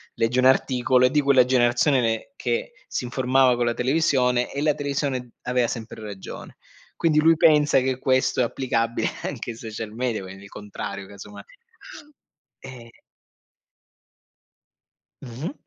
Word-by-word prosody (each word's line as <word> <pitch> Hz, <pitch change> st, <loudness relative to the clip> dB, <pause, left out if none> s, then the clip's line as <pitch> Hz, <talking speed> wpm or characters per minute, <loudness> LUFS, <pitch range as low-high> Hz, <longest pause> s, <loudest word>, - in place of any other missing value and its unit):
legge 115 Hz, +2 st, 0 dB
un 130 Hz, -, +3 dB
articolo, 130 Hz, -1 st, +3 dB
è -, -, +4 dB
di 150 Hz, +3 st, +2 dB
quella 135 Hz, -3 st, +4 dB
generazione 125 Hz, +2 st, +2 dB
ne 115 Hz, -, -2 dB
che 485 Hz, +7 st, -3 dB
si -, -, -4 dB
informava 130 Hz, +1 st, +2 dB
con 120 Hz, -, -1 dB
la 120 Hz, -, +1 dB
televisione, 125 Hz, -2 st, +1 dB
e 140 Hz, -, -4 dB
la 150 Hz, 0 st, +2 dB
televisione 140 Hz, -4 st, -3 dB
aveva 125 Hz, -1 st, +1 dB
sempre 110 Hz, -1 st, -7 dB
ragione. 100 Hz, -3 st, -9 dB, 0.4 s
Quindi 155 Hz, -2 st, +2 dB
lui 165 Hz, +1 st, +4 dB
pensa 150 Hz, -3 st, +4 dB
che 130 Hz, 0 st, -1 dB
questo 130 Hz, -1 st, +1 dB
è -, -, +4 dB
applicabile 115 Hz, -1 st, -1 dB
anche -, -, -5 dB
ai 115 Hz, -, -10 dB
social 110 Hz, -1 st, -7 dB
media, 120 Hz, -2 st, -2 dB
quindi 95 Hz, +1 st, -11 dB
il 100 Hz, -, -13 dB
contrario, 100 Hz, -1 st, -7 dB
casomai. 100 Hz, -, -11 dB, 1.2 s
Ehm 120 Hz, -3 st, -11 dB, 2.3 s
Mh-mh. 130 Hz, -, -6 dB
125 Hz, 140 wpm, -23 LUFS, 115-140 Hz, 2.3 s, è